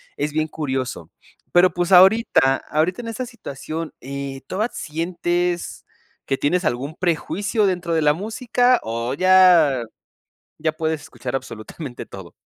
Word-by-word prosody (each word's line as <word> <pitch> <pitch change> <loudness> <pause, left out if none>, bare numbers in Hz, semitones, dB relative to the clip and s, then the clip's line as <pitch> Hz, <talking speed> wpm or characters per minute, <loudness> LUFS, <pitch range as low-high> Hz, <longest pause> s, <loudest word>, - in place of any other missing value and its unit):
es 145 +1 -2
bien 155 +1 0
curioso, 130 - -4 0.4
pero 180 +1 +5
pues, 175 +1 -1
ahorita 185 - +5
ahorita 165 +8 0
en 235 - -8
esta 230 +3 -4
situación, 165 - -7
eh, 135 0 -6
¿toda 215 +5 -1
sientes 175 +2 -2 0.4
que 135 - -1
tienes 180 +5 0
algún 135 +5 -2
prejuicio 185 +5 0
dentro 175 -3 -1
de 160 - +2
la 150 0 +5
música 235 - +1
o 115 +2 -3
ya 175 -6 +5 0.7
ya 160 - 0
puedes 160 -1 -2
escuchar 125 0 -6
absolutamente 120 +2 -7
todo? 95 -3 -11
160 Hz, 135 wpm, -21 LUFS, 140-185 Hz, 0.7 s, pero